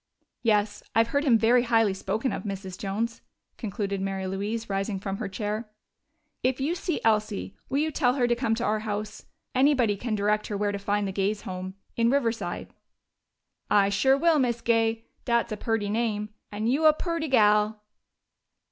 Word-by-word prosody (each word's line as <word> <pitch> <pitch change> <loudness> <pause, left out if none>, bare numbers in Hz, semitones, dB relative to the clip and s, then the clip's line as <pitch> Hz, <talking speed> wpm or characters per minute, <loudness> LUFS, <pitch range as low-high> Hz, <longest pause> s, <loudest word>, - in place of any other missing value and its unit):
"Yes, 210 -2 +1
I've 225 0 +4
heard 285 +4 +1
him 240 -5 +6
very 235 +2 +4
highly 225 -4 +3
spoken 210 +6 -2
of, - - -3
Mrs. 195 -3 -5
Jones," 215 +5 -3 0.4
concluded 200 -2 -3
Mary 195 0 -2
Louise, 205 +4 -3
rising 195 0 -2
from 195 0 -4
her 215 -3 -4
chair. 215 +2 -3 0.7
"If 260 +1 +1
you 285 +5 0
see 350 -2 -2
Elsie, 210 - +1
will 270 - 0
you 310 +2 +1
tell 255 -4 +2
her 250 -3 +2
to 240 - +3
come 235 -2 0
to 235 - -3
our 215 -2 +1
house? 210 0 -5 0.3
Anybody 255 -5 +3
can 220 +2 -2
direct 210 +1 +1
her 205 - -3
where 205 0 0
to 200 - -4
find 205 0 0
the - - -2
Gays' 200 +2 -1
home, 185 0 -6 0.2
in 230 0 +3
Riverside." 235 -4 -1 1.0
"I 200 -1 +4
sure 265 +7 +3
will, 325 0 +4
Miz 240 -3 0
Gay. 225 -1 +1 0.2
Dat's 235 -1 +1
a 215 - -2
perty 225 -1 -1
name.... 215 -2 -1 0.2
And 210 +2 -2
you 280 +6 +2
a 310 - +8
perty 335 0 -2
gal!" 210 -3 +3
220 Hz, 180 wpm, -27 LUFS, 205-240 Hz, 1.0 s, a